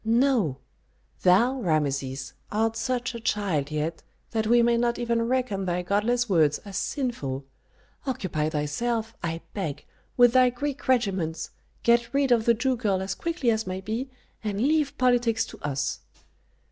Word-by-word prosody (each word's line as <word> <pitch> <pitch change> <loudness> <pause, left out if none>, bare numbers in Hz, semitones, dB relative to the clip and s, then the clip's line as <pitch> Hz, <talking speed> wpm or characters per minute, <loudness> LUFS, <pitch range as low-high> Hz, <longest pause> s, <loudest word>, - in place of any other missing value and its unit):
"No. 230 - +2 0.6
Thou, 230 +9 +4
Rameses, 140 - -1 0.2
art 225 +1 +1
such 250 +1 -1
a 235 - -5
child 195 -10 0
yet 155 +2 -2 0.3
that 220 -2 0
we 240 +1 +5
may 235 0 +4
not 235 0 +1
even 235 -1 0
reckon 245 -6 0
thy 180 0 -1
godless 230 +6 +1
words 155 -7 +3
as 200 -1 -8
sinful. 145 - -2 0.6
Occupy 165 - -1
thyself, 220 +10 -2
I 165 0 -3
beg, 180 -9 -4 0.3
with 245 -1 +6
thy 255 -1 +6
Greek 280 +3 -4
regiments, 195 -10 0 0.3
get 235 +1 +3
rid 275 -2 +2
of 230 -2 +4
the 235 - +5
Jew 255 +2 0
girl 205 -5 +1
as 190 +1 -2
quickly 330 -8 0
as 220 -2 -1
may 185 0 -3
be, 225 +7 -3 0.3
and 205 -2 -2
leave 290 +2 +1
politics 240 -3 +2
to - - -12
us." 140 -2 -2
225 Hz, 155 wpm, -26 LUFS, 180-245 Hz, 0.6 s, with